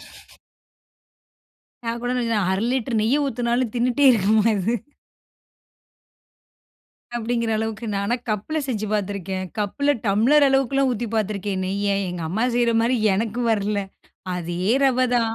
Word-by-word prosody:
ஊத்துற. - - -17 1.5
நான் 230 +1 -2
கூட 245 0 -1
ந 230 -2 0
1/2 190 +3 0
லிட்டர் 250 -3 -1
நெய்ய 265 +7 +2
ஊத்தினாலும் 240 -2 -1
தின்னுட்டே 245 +3 +1
இருக்குமா 215 -2 +3
இது? 210 +5 0 2.4
அப்டீங்கிற 235 0 -1
அளவுக்கு 220 +1 -3
நானா 200 +4 0 0.2
கப்ல 215 +10 -2
செஞ்சு 215 -4 -2
பாத்துருக்கேன். 195 -2 -2
கப்ல 285 +8 +1
டம்ளர் 245 +9 +4
அளவுக்கெல்லாம் 270 0 +2
ஊத்தி 240 0 -3
பாத்துருக்கேன் 200 -2 -2
நெய்ய 200 +1 0
எங்க 175 -1 -5
அம்மா 215 +8 0
செய்ற 235 -1 +2
மாரி 245 +2 +2 0.2
எனக்கு 225 +4 -2
வரல. 210 -1 0 0.6
அதே 175 0 -4 0.2
ரவ 260 -2 +3 0.2
தான். 230 -2 +1
225 Hz, 125 wpm, -23 LUFS, 200-245 Hz, 2.4 s, டம்ளர்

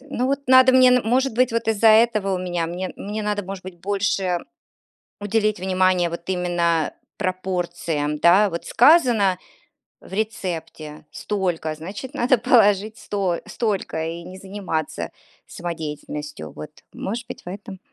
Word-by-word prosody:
ну 260 -2 -3
вот 275 +1 0
надо 260 0 +7
мне, 255 0 +7
н 250 -1 +4
может 255 +2 +2
быть, 255 -1 +2
вот 230 -1 -1
из-за 225 0 +4
этого 215 -3 +4
у - - -2
меня 175 -2 -2
мне 180 +2 -4
мне 210 +2 -5
надо, 205 -1 -1
может 195 0 -7
быть, 185 -2 -9
больше 195 -2 0 0.8
уделить 210 -1 0
внимание 185 -2 +2
вот 170 0 -6
именно 175 -3 +1 0.3
пропорциям, 175 -6 -2
да, 190 +6 +5
вот 170 -1 -5
сказано 240 - +4 0.6
в - - -16
рецепте 175 -7 -4
столько, 180 -6 -2
значит, 195 - -8
надо 255 -2 +3
положить 215 -3 +3
сто 190 -4 -2
столько 210 -8 -2
и 170 +1 -6
не 185 +1 -10
заниматься 165 - -4 0.4
самодеятельностью, 150 -3 -6
вот, 150 - -9 0.2
может 230 +5 -4
быть, 250 - -9
в - - -18
этом. 195 0 -8
190 Hz, 145 wpm, -22 LUFS, 175-220 Hz, 0.8 s, надо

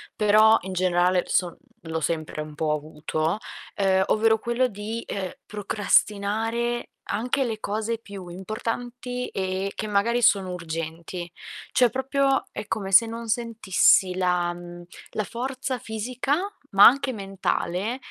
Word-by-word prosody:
però 215 +1 +6
in 190 +1 -6
generale 180 0 +2
son 180 -2 0
mhmm, 230 - -14
l'ho 160 - -1
sempre 155 0 -2
un 150 0 -7
po' 155 0 -1
avuto, 155 +4 -2 0.4
uhm, 190 -1 +3
ovvero 220 0 +3
quello 235 +3 0
di, 220 +1 -5
uhm, 190 -2 -3 0.2
procrastinare 215 +3 0 0.2
anche 250 +6 0
le 225 -4 -3
cose 220 +2 -2
più 200 -4 -10
importanti 240 +6 -4
e 190 +1 -2
che - - -4
magari 220 +4 +1
sono 195 -5 +3
urgenti. 165 +1 -5 0.4
Cioè, 250 -2 +4
proprio 270 +2 +1
è 210 - -6
come 195 -3 -3
se 210 +4 +7
non 230 0 -6
sentissi 215 -5 +3
la 180 -1 +1
mhmm, 175 0 -10 0.3
la 215 - -1
forza 255 +4 -4
fisica, 245 +5 -2 0.4
ma 195 +1 +8
anche 270 +1 +6
mentale, 195 +2 -2
205 Hz, 135 wpm, -25 LUFS, 180-230 Hz, 0.4 s, ma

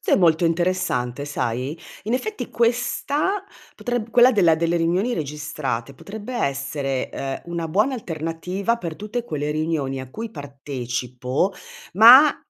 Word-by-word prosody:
S - - -3
è - - +7
molto 170 -2 +4
interessante, 165 -7 0
sai? 135 +2 -2 0.3
In 225 - 0
effetti, 425 - -3
questa 280 - 0 0.3
potreb 240 -2 -3
quella 245 +2 +7
della 175 -7 +5
delle 170 +1 0
riunioni 180 +8 +1
registrate 145 -4 -4
potrebbe 210 - -8
essere, 140 - -2
uhm, 135 +5 -5
una 165 -1 -2
buona 215 - +2
alternativa 180 +2 -2
per 170 -8 -5
tutte 220 +3 -4
quelle 150 -6 -3
riunioni 150 -3 -1
a 130 -1 -9
cui 225 +5 -6
partecipo, 130 - -3 0.4
ma 250 +9 +9
165 Hz, 135 wpm, -23 LUFS, 140-220 Hz, 0.4 s, ma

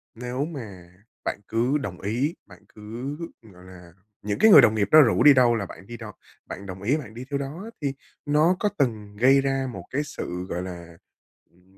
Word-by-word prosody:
nếu 125 +4 -3
mà 105 - -9 0.4
bạn - - -2
cứ 120 +6 +1
đồng 100 -12 -6
ý, 125 - -1
bạn 90 -3 -15 0.2
cứ, 115 +7 -6 0.2
gọi 95 -6 -17
là, 90 -2 -14 0.3
những 105 0 -3
cái 220 - +6
người - - +11
đồng 110 - +4
nghiệp 100 -2 +1
đó 155 - +9
rủ 120 -6 +3
đi 150 - +9
đâu 125 -3 +4
là 105 -4 -2
bạn 95 - -12
đi 120 - -8
đo 110 -3 -9 0.3
bạn 100 - -8
đồng 95 0 -8
ý 130 +9 +1
bạn 125 -9 -9
đi 120 +3 -8
theo 140 - 0
đó 140 +5 -6
á, 225 - -8
thì 140 -2 -1 0.3
nó 155 +5 +3
có 210 - +1
từng 110 -6 -1
gây 135 +4 +5
ra 135 -1 -1
một 95 - -8
cái 140 - -1
sự, 90 -9 -6
gọi 90 - -3
là, 85 -2 -9 0.5
ừm, 90 +2 -28
115 Hz, 220 wpm, -25 LUFS, 95-140 Hz, 0.5 s, người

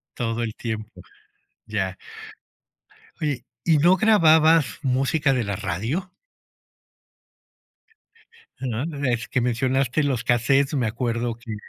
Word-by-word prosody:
Todo 115 -1 -2
el 110 -2 -4
tiempo, 110 -5 -6 0.6
ya. 95 -3 -2 1.2
Oye, 140 -5 -2 0.2
¿y 160 -3 +3
no 175 +5 +4
grababas 160 -7 +4
música 135 +2 +1
de 125 -3 0
la 100 -1 -3
radio? 115 - -3 2.5
No, 125 -1 -3 0.2
es 120 -2 -1
que 125 - 0
mencionaste 130 +3 0
los 130 -4 -1
cassettes, 135 +5 +2
me 125 -5 +1
acuerdo 115 0 -2
que, 115 -2 -8
125 Hz, 110 wpm, -23 LUFS, 115-145 Hz, 2.5 s, no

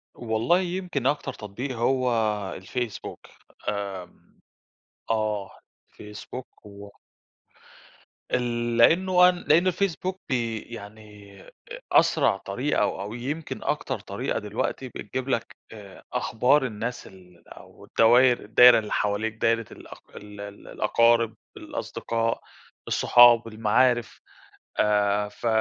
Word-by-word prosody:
والله 115 +9 +1
يمكن 180 -7 -2
أكتر 145 +1 -1
تطبيق 120 +5 -6
هو 130 +1 +1 0.5
الفيسبوك. 115 +4 -5 0.5
آمم 100 -3 -7 0.7
آه 105 -3 -1 0.4
الفيسبوك 105 +3 -11
و 100 0 -11 1.4
ال 120 -1 -1
لأنه 180 +8 +5
أن 180 - 0
لأنه 170 +5 +4
الفيسبوك 185 0 -2
بي 115 -3 -1
يعني 105 -2 -12
أ - - -16 0.4
أسرع - - +3
طريقة - - -2
أو - - -1
أو 100 +2 -6
يمكن 140 +7 -5
أكتر - - -2
طريقة - - -3
دلوقتي 110 +5 -4
بتجيب 130 +4 -6
لك 120 - -2 0.2
آآ 105 -3 -12
أخبار 130 +5 +2
الناس 115 +1 -5
ال 90 -2 -18
أو - - -15
الدواير 120 +2 +4
الدايرة 120 +3 +7
اللي 105 - -7
حواليك 105 +2 -1
دايرة 115 0 +1
الأق - - -12 0.2
ال 105 0 -10
ال 100 0 -10
الأقارب، 115 -1 +2 0.2
الأصدقاء، 115 0 -3 0.5
الصُحاب، 120 -1 +6
المعارف، 115 +2 +1 0.6
آآ، 105 0 +2
ف 120 - -6
115 Hz, 110 wpm, -25 LUFS, 105-125 Hz, 1.4 s, الدايرة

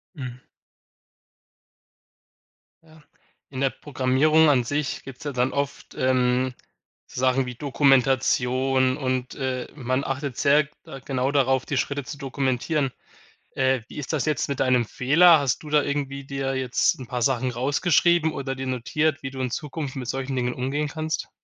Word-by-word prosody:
Mhm. 125 -3 -7 2.4
Ja. 160 -1 -19 0.5
In 130 -1 -5
der 135 - +3
Programmierung 145 +3 +2
an 130 -4 +4
sich 145 +3 -2
gibt's 135 0 -10
ja 145 - -3
dann 125 0 0
oft, 140 0 -4
ähm, 130 0 +2 0.5
so - - -7
Sachen 130 0 +2
wie 125 -1 -6
Dokumentation 130 -1 +2
und, 130 -2 -2
äh, 130 -3 -3
man 130 0 -1
achtet 135 -2 -4
sehr, 140 0 +4 0.2
äh, 135 -1 -9
genau 135 0 0
darauf, 135 -2 +2
die 135 - -2
Schritte 140 0 -1
zu 145 - -8
dokumentieren. 135 +1 -1 0.6
Äh, 130 -2 +2
wie - - -12
ist 150 +2 -4
das 150 - 0
jetzt 155 -1 0
mit 140 - -3
deinem 125 -3 +3
Fehler? 160 +8 +5
Hast 140 +1 -1
du 150 - -8
da 150 -1 +4
irgendwie 140 -1 -3
dir 135 -1 -3
jetzt 130 0 +1
'n 125 - -8
paar 125 -2 -3
Sachen 130 0 +1
rausgeschrieben 160 +5 +2
oder 135 -1 -3
dir 130 0 -5
notiert, 145 +5 -1
wie 135 - -4
du 135 - -8
in 125 -2 -2
Zukunft 150 -1 -5
mit 125 -3 -5
solchen 135 +1 -3
Dingen 125 -1 -1
umgehen 140 +4 -2
kannst? 155 +1 -3
135 Hz, 160 wpm, -24 LUFS, 130-145 Hz, 2.4 s, Fehler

